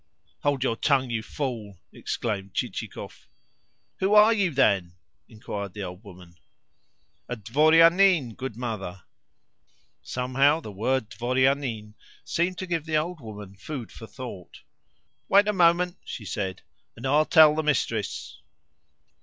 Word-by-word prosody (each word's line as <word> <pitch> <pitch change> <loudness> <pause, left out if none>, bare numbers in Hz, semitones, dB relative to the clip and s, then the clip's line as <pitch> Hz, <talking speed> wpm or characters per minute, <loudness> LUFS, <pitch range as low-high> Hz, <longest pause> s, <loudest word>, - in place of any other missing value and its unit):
"Hold 140 -3 0
your 115 -4 0
tongue, 130 -3 +1
you 115 -1 -1
fool!" 110 -7 -5 0.2
exclaimed 100 -4 -4
Chichikov. - - -5 0.7
"Who 195 +2 +2
ARE 215 +2 +7
you, 200 -5 +1
then?" 100 - +2 0.4
inquired 105 -4 -7
the 105 - -5
old 90 +2 -8
woman. 90 -4 -14 0.9
"A 125 - -2
dvorianin, 155 - +4
good 130 -4 -6
mother." 105 -7 -5 1.0
Somehow 135 +5 +1
the 110 - -9
word 110 +3 -1
dvorianin 125 -1 0 0.3
seemed 175 +2 -1
to 185 - -4
give 165 -4 -2
the 155 -1 +1
old 165 +1 -3
woman 105 -4 -9
food 120 +4 -7
for 115 - -11
thought. 120 -9 -10 0.7
"Wait 200 +1 +5
a 210 - +2
moment," 175 0 +3
she 110 - -8
said, 95 -1 -4 0.3
"and 120 - -9
I 135 - 0
will 155 - +3
tell 155 -3 +7
the 155 - 0
mistress." 150 - -2
130 Hz, 135 wpm, -26 LUFS, 105-155 Hz, 1.0 s, ARE